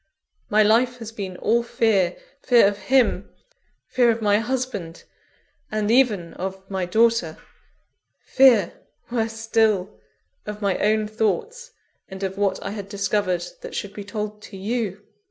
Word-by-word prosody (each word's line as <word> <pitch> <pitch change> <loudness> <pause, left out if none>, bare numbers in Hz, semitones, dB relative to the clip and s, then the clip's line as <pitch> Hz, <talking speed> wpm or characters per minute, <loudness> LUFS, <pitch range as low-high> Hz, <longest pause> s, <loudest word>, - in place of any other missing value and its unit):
My 215 +1 +4
life 240 +4 +3
has 225 -2 -8
been 195 -5 -6
all 235 +5 +2
fear 210 -6 +1 0.2
fear 240 -6 +5
of 205 0 -2
him; 240 -7 +3 0.6
fear 245 -2 +2
of 230 0 +1
my 205 -1 +3
husband, 230 -8 -4 0.7
and 215 0 0
even 220 -9 +2
of 190 +1 -6
my 190 -2 -2
daughter; 220 -5 +2 0.9
fear, 245 -9 +5 0.4
worse 225 -2 -1
still, 220 -3 0 0.5
of 210 0 -5
my 200 -3 0
own 215 0 +2
thoughts, 425 - -2 0.4
and 190 +1 -8
of 190 0 -2
what 200 -1 0
I 195 - -4
had 200 -2 -7
discovered 195 -3 -1 0.2
that - - -8
should 200 -1 -4
be 205 - -7
told 210 0 -5
to 200 - -11
_you. 205 -1 -3
210 Hz, 145 wpm, -23 LUFS, 195-230 Hz, 0.9 s, fear